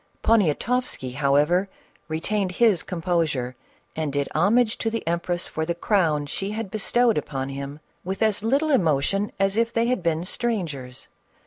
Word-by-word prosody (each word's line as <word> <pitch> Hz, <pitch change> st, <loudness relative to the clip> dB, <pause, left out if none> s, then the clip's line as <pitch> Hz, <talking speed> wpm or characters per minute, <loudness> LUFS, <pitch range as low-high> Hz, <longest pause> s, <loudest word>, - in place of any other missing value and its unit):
Poniatoffsky, 215 Hz, -, +1 dB
however, 150 Hz, +7 st, +2 dB, 0.4 s
retained 185 Hz, +4 st, -1 dB
his 210 Hz, -5 st, +4 dB
composure 165 Hz, -9 st, -1 dB, 0.4 s
and 155 Hz, -2 st, -2 dB
did 140 Hz, 0 st, -1 dB
homage 215 Hz, +7 st, +3 dB
to 225 Hz, -, 0 dB
the 225 Hz, -6 st, -4 dB
empress 170 Hz, +1 st, -1 dB
for 160 Hz, -, -3 dB
the 170 Hz, +1 st, -1 dB
crown 165 Hz, -6 st, +1 dB
she 195 Hz, +7 st, -4 dB
had 220 Hz, -3 st, -4 dB
bestowed 230 Hz, 0 st, +2 dB
upon 135 Hz, -2 st, -4 dB
him, 140 Hz, +2 st, -6 dB, 0.2 s
with 190 Hz, +4 st, -2 dB
as 215 Hz, -2 st, +2 dB
little 275 Hz, +8 st, +1 dB
emotion 195 Hz, -, +2 dB
as 195 Hz, 0 st, +2 dB
if 230 Hz, +1 st, +1 dB
they 230 Hz, 0 st, +1 dB
had 250 Hz, -3 st, 0 dB
been 165 Hz, 0 st, 0 dB
strangers. 160 Hz, -, -3 dB
180 Hz, 150 wpm, -24 LUFS, 150-220 Hz, 0.4 s, his